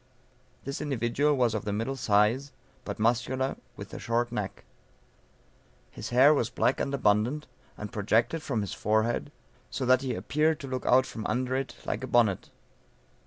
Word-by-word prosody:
This 140 +1 -4
individual 140 +1 +1
was 120 -3 +2
of 110 - -2
the 105 - -2
middle 115 +6 -2
size, 115 +4 +2 0.3
but - - -4
muscular, 120 +4 +1 0.2
with - - -9
a - - -6
short 120 +1 0
neck. - - -4 1.3
His - - -7
hair 130 +5 +6
was 120 -6 0
black 130 - +1
and 140 - -1
abundant, 125 +3 +1 0.3
and 105 -1 -6
projected 115 +9 +1
from 120 -8 -1
his 100 - -4
forehead, 110 +6 0 0.4
so 130 - -3
that 130 0 +4
he 130 -3 -2
appeared 150 +11 +1
to 140 - -6
look 130 -1 -4
out 130 +1 +5
from 110 - -7
under 130 +1 -1
it, 135 0 -3
like - - -3
a - - -3
bonnet. 115 -6 +2
125 Hz, 165 wpm, -28 LUFS, 110-135 Hz, 1.3 s, hair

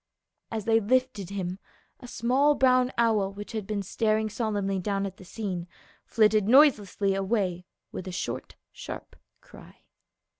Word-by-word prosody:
As 220 -2 -4
they 225 0 +4
lifted 250 -3 0
him, 190 -2 -4 0.4
a 250 - -11
small 265 +5 +2
brown 255 -1 +3
owl 220 -4 +2
which 205 +1 -8
had 215 -4 -4
been 205 -2 -2
staring 215 +2 0
solemnly 205 -4 -1
down 200 +1 -1
at 190 -1 -7
the - - -13
scene 185 -2 -5 0.4
flitted 215 -2 +3
noise 275 +3 +7
lessly 195 0 -2
away 190 -3 -1 0.2
with 185 - -7
a - - -4
short 130 -8 -5 0.2
sharp - - -9 0.3
cry. - - -16
210 Hz, 150 wpm, -27 LUFS, 195-230 Hz, 0.4 s, noise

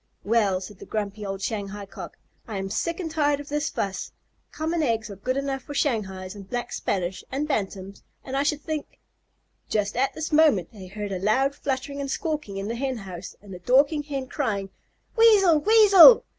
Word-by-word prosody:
"Well," 205 -4 +2
said 190 0 -10
the - - -11
grumpy 210 -1 -3
old 195 -1 -5
Shanghai 205 -1 -4
Cock, 195 - -10 0.3
"I 215 -3 -4
am 195 0 -4
sick 335 - -2
and 330 -4 -4
tired 290 -2 +1
of 290 +1 -9
this 295 +1 -1
fuss. 195 -1 -3 0.4
Common 320 +2 -2
eggs 225 -6 0
are - - -7
good 255 +7 -2
enough 275 -1 -2
for 290 - -9
Shanghais 190 -9 -1
and 200 -2 -11
Black 245 -1 -3
Spanish 185 -1 -2
and 280 +3 -2
Bantams, 195 -6 -3 0.2
and 265 - -5
I 275 - +2
should 290 +1 0
think 310 -1 -5 0.3
" - - -45
Just 205 0 -1
at 265 +3 0
this 315 0 -4
minute 295 - +4
they 190 -4 -10
heard 205 +1 -6
a 185 - -2
loud 260 +8 +2
fluttering 280 0 -3
and 275 - -4
squawking 300 -9 -3
in 195 +1 -4
the 230 - -2
Hen 260 +1 -2
house 185 -3 -8
and 200 -2 -10
the 180 - -8
Dorking 280 - +3
Hen 280 -3 -4
crying, 205 -9 -2 0.4
"Weasel! 410 -8 +6
Weasel!" 425 +2 +8
245 Hz, 200 wpm, -25 LUFS, 200-295 Hz, 0.4 s, Weasel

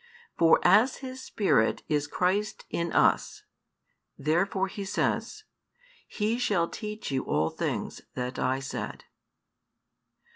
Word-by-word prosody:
For 165 -1 +5
as 245 +5 +5
His 260 0 -7
Spirit 190 - +1
is 145 -1 0
Christ 200 +7 -1
in 170 -1 -1
us, - - +2 0.7
therefore 190 +5 +1
He 200 +1 -6
says, 425 - -1 0.6
He 220 +3 -1
shall 195 -8 +1
teach 215 -4 -6
you 130 -1 0
all 80 +1 +1
things - - -3
that 125 0 -3
I 130 +1 0
said. 135 - -5
190 Hz, 115 wpm, -28 LUFS, 145-215 Hz, 0.7 s, For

